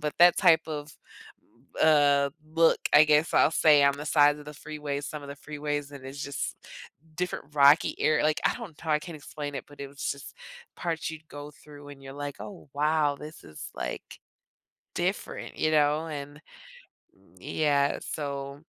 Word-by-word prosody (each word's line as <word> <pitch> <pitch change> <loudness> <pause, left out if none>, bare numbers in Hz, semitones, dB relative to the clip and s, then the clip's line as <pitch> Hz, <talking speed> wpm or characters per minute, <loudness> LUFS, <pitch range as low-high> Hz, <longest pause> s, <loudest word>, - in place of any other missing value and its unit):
but 150 -1 -2
that 175 0 +7
type 160 -1 +5
of, 150 -1 -6 0.9
uh, 145 -2 +4 0.2
look, 165 0 +4
I 155 - +8
guess, 150 +1 +3
I'll - - +5
say, 150 -3 +5
on 140 0 +3
the 150 - -6
side 145 0 +4
of 150 - -11
the 150 - -9
freeway 150 -1 -5
some 150 +1 -6
of 140 - -10
the 140 - -7
freeways, 145 -1 -4
and 135 -2 -10
it's 140 +2 -7
just 140 0 -4 0.6
different 155 -4 -4
rocky 145 +2 +5
ar 155 - +3
like, 155 0 +1
I - - +3
don't 230 -6 -7
know - - -14
how 160 - -2
I 150 - +3
can 165 +2 -9
explain 145 0 -7
it, - - -5
but 145 -1 -15
it 140 - -4
was 140 0 -4
just 140 - -8 0.4
parts 160 -2 -3
you'd 160 0 -10
go 145 0 -9
through, 145 -1 -14
and 140 -1 -12
you're 135 0 -9
like, 145 0 -5
"Oh, 190 -7 -10
wow, 150 -1 +2
this 155 +2 -11
is, 75 -1 -9
like, - - -6 0.8
different." - - -3
You 155 - +1
know? 150 +1 +2
And 145 0 -7 1.0
yeah. 145 -2 +1
So 140 -1 -5
150 Hz, 180 wpm, -27 LUFS, 140-155 Hz, 1.0 s, I